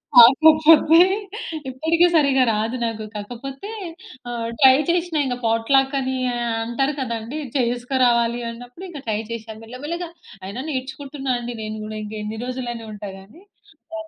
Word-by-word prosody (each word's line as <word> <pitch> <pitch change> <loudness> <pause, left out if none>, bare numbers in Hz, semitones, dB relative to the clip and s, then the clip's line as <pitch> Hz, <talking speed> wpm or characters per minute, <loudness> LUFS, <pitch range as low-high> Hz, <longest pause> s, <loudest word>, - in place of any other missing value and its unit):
కాకపోతే 310 +6 +7 0.7
ఇప్పటికి 320 +6 +2
సరిగా 280 -4 +4
రాదు 220 +3 -1
నాకు. 225 -1 -3
కాకపోతే 245 - -7 0.6
ఆహ్, 235 -1 -3
ట్రై 265 -2 +8
చేషినా, 340 -2 +1
ఇంక 250 -2 -2
పాట్‌లాక్కని 265 +3 +1 0.5
అంటారు 270 +5 -1
గదండీ, 235 +3 -4 0.2
చేస్కరావాలి 245 -1 +1
అన్నప్పుడు 245 +9 -10
ఇంక 300 -5 -8
ట్రై 215 -1 0
చేషా. 225 -1 -6
మెల్లమెల్లగా 295 +9 -6 0.4
అయినా 205 +7 -5
నేర్చుకుంటున్నా 270 0 -4
అండి 240 0 -6
నేను 215 0 -5
గూడా. 215 0 -6
ఇంకెన్ని 215 +1 -6
రోజులని 245 -2 -5
ఉంటా 205 -1 -7
గానీ, 210 - -16 0.6
ఆహ్, 320 0 -7
250 Hz, 125 wpm, -22 LUFS, 230-280 Hz, 0.7 s, ట్రై